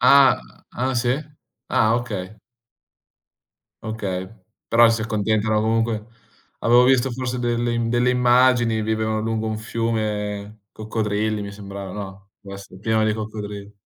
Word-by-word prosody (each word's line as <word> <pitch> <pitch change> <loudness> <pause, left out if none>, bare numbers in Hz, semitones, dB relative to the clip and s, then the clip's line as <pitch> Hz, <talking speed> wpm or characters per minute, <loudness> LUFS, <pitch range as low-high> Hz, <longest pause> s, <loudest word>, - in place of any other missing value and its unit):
Ah, 135 - +6 0.3
ah 130 +1 -1
sì? 120 0 0 0.6
Ah, 110 +1 +3
okay. 105 -5 -4 1.5
Okay, 95 -4 -4 0.4
però 115 0 +6
si 115 -1 0
accontentano 110 0 +1
comunque 115 0 0 0.6
avevo 120 +1 +5
visto 130 0 +3
forse 125 0 -3
delle 120 0 0
im 115 -1 0
delle 120 +1 +2
immagini, 125 -2 +3
vivevano 110 0 -1
lungo 110 0 -2
un 110 0 -2
fiume 110 -2 -3
coccodrilli 110 -1 -2
mi 100 0 -6
sembrava, 100 -1 -8
no, 95 -1 -8
dov 100 -1 -9
esse 100 -1 -11
pieno 110 +1 +1
di 110 - +2
coccodrilli. 105 -2 -6
110 Hz, 130 wpm, -22 LUFS, 105-120 Hz, 1.5 s, Ah